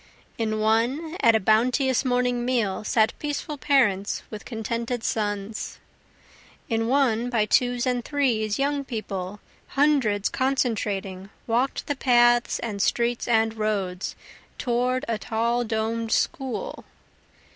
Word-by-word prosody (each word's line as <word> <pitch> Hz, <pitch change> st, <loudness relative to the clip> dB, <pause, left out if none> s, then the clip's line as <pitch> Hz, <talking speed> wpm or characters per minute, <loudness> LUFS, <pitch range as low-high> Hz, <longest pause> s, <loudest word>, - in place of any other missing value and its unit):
In 215 Hz, -1 st, -1 dB
one, 240 Hz, +10 st, +1 dB
at 230 Hz, -1 st, +5 dB
a -, -, +4 dB
bounteous 245 Hz, +6 st, +2 dB
morning 245 Hz, -1 st, +1 dB
meal, 235 Hz, -6 st, 0 dB
Sat 220 Hz, +1 st, +2 dB
peaceful 295 Hz, 0 st, -3 dB
parents 210 Hz, -10 st, +2 dB
with 215 Hz, -1 st, -8 dB
contented 230 Hz, +1 st, -3 dB
sons. 205 Hz, 0 st, -3 dB, 0.9 s
In 225 Hz, -3 st, 0 dB
one, 245 Hz, -3 st, +2 dB
by 225 Hz, -3 st, +2 dB
twos 245 Hz, +3 st, +2 dB
and 250 Hz, -1 st, 0 dB
threes, 230 Hz, -8 st, 0 dB
young 280 Hz, +1 st, 0 dB
people, 205 Hz, -6 st, -5 dB, 0.4 s
Hundreds 265 Hz, -9 st, +3 dB
concentring, 205 Hz, -7 st, -1 dB, 0.2 s
walk'd 245 Hz, +4 st, 0 dB
the 290 Hz, -, -2 dB
paths 240 Hz, -2 st, +4 dB
and 210 Hz, -4 st, -4 dB
streets 235 Hz, +2 st, 0 dB
and 225 Hz, -1 st, +3 dB
roads, 195 Hz, -4 st, -2 dB, 0.4 s
Toward 250 Hz, +2 st, 0 dB
a 225 Hz, -2 st, -1 dB
tall 235 Hz, +3 st, 0 dB
domed 225 Hz, 0 st, -2 dB
school. 270 Hz, -4 st, -1 dB
235 Hz, 120 wpm, -25 LUFS, 215-255 Hz, 0.9 s, at